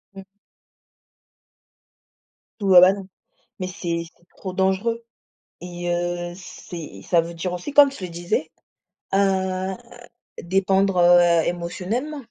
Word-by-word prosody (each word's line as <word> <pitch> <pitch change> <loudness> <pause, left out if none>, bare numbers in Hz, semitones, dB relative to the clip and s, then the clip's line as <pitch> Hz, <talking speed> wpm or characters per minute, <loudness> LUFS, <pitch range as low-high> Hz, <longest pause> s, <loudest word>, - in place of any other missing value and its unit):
Mmh. 195 - -9 2.4
Ouais 190 -3 +7
bah, 185 - +8
non. 195 -1 -8 0.5
Mais 185 - -3
c'est 170 -3 -3
c'est 175 - -30
trop 185 -2 -7
dangereux 195 +5 0 0.6
et 175 0 -5
heu, 175 0 -3
c'est 170 - -10
ça 170 -1 +3
veut 170 +1 -7
dire 180 +2 -3
aussi, 180 +11 -5
comme 285 -1 +7
je 235 -9 -10
le 180 - -4
disais, 170 -2 -2 0.6
heu, 190 -1 +1 0.7
dépendre, 195 +1 +1
heu, 175 -1 +5
émotionnellement. 190 - -3
180 Hz, 115 wpm, -22 LUFS, 175-195 Hz, 2.4 s, bah